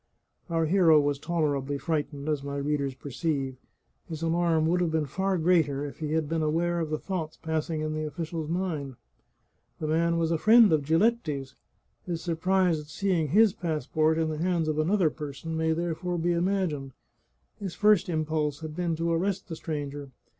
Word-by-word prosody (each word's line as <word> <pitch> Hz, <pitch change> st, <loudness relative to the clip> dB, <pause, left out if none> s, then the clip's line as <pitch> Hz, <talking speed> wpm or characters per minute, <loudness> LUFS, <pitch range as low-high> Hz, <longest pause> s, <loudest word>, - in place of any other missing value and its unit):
Our 165 Hz, -1 st, +1 dB
hero 165 Hz, -2 st, +5 dB
was 145 Hz, -1 st, 0 dB
tolerably 145 Hz, -4 st, -1 dB
frightened, 145 Hz, -2 st, -3 dB
as 150 Hz, -2 st, 0 dB
my 140 Hz, 0 st, -4 dB
readers 140 Hz, -2 st, -1 dB
per 140 Hz, -, -9 dB
ceive. 135 Hz, -3 st, -2 dB, 0.5 s
His 160 Hz, -1 st, -5 dB
alarm 165 Hz, -1 st, +2 dB
would 175 Hz, +2 st, +2 dB
have 175 Hz, -, +1 dB
been 160 Hz, -1 st, 0 dB
far 190 Hz, +6 st, -1 dB
greater 160 Hz, -5 st, +2 dB
if 145 Hz, -, -8 dB
he 155 Hz, -1 st, -2 dB
had 160 Hz, -2 st, 0 dB
been 165 Hz, +1 st, -1 dB
aware 170 Hz, +3 st, +1 dB
of 160 Hz, -2 st, -2 dB
the 155 Hz, -, -1 dB
thoughts 165 Hz, -3 st, -4 dB
passing 160 Hz, 0 st, -2 dB
in 155 Hz, 0 st, -2 dB
the 155 Hz, 0 st, -2 dB
official's 160 Hz, 0 st, -5 dB
mind. 160 Hz, -7 st, -2 dB, 0.8 s
The -, -, -3 dB
man 170 Hz, +2 st, +1 dB
was 165 Hz, 0 st, +1 dB
a 165 Hz, -, +1 dB
friend 220 Hz, -2 st, +7 dB
of 155 Hz, -, +3 dB
Giletti's; 160 Hz, -, +1 dB, 0.5 s
his 170 Hz, -2 st, -3 dB
surprise 180 Hz, 0 st, +1 dB
at 150 Hz, -, -10 dB
seeing 170 Hz, 0 st, 0 dB
his 205 Hz, +6 st, +5 dB
passport 155 Hz, -2 st, 0 dB
in 160 Hz, -1 st, +1 dB
the 155 Hz, -1 st, -4 dB
hands 170 Hz, -2 st, 0 dB
of 155 Hz, 0 st, 0 dB
another 170 Hz, 0 st, +2 dB
person 150 Hz, +2 st, -6 dB
may 160 Hz, 0 st, +1 dB
therefore 175 Hz, +2 st, -2 dB
be 170 Hz, +1 st, +1 dB
imagined. 170 Hz, -6 st, -1 dB, 0.7 s
His 195 Hz, -4 st, -5 dB
first 210 Hz, -2 st, +4 dB
impulse 155 Hz, -2 st, -1 dB
had 155 Hz, -1 st, -6 dB
been 175 Hz, -2 st, -1 dB
to 165 Hz, +1 st, -1 dB
arrest 190 Hz, +4 st, -1 dB
the 165 Hz, -, -4 dB
stranger. 145 Hz, -3 st, -5 dB
160 Hz, 180 wpm, -27 LUFS, 150-175 Hz, 0.8 s, friend